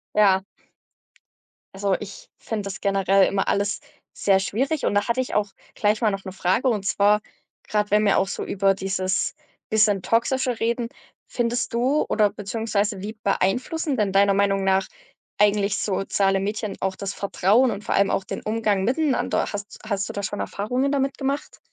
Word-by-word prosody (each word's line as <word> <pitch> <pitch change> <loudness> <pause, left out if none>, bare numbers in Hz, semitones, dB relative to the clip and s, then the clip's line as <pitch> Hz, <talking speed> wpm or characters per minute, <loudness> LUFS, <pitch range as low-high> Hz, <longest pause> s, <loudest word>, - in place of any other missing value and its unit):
Ja, 195 -2 +4 1.3
Also, 195 -1 +1
ich 200 -1 -10
finde 220 -2 -4
das 195 - -6
generell 195 -1 +3
immer 195 -1 -1
alles 200 +1 0 0.4
sehr 195 -1 +3
schwierig, 270 +10 -1
und - - +1
da 205 +2 +1
hatte 235 +2 0
ich 255 - -5
auch 210 -1 +1 0.2
gleich 210 0 +1
mal 215 -3 +3
noch 195 0 -4
'ne 190 - -6
Frage. 190 +7 0
Und 205 -4 -1
zwar, 205 +2 +3 0.5
grad, 210 -1 0
wenn 210 +1 +3
wir 200 - +4
auch 190 - +1
so - - -4
über 195 0 +2
dieses 190 -1 -1 0.4
bisschen 210 -3 +3
Toxische 250 +1 +1
reden, 235 +1 0 0.4
findest 240 0 -2
du 260 +6 +2
oder 210 -2 +3
beziehungsweise 205 -1 -2
wie 210 +2 -5
beeinflussen 255 - 0
denn 205 -3 +1
deiner 200 0 +4
Meinung 195 -1 +2
nach 190 0 +2 0.5
eigentlich 205 -1 +3
soziale 195 0 +1
Medien 210 +1 -3
auch 190 0 -1
das 200 0 -5
Vertrauen 210 +5 +2
und 205 0 -6
vor - - -1
allem 200 0 +3
auch 195 - 0
den - - -6
Umgang 215 -3 0
miteinander? 270 +4 +1
Hast 205 0 -7
hast 200 -3 -2
du - - -6
da 200 - -3
schon 205 +1 -4
Erfahrungen 250 +7 -1
damit 275 -1 0
gemacht? 275 +1 -3
205 Hz, 175 wpm, -23 LUFS, 195-230 Hz, 1.3 s, Ja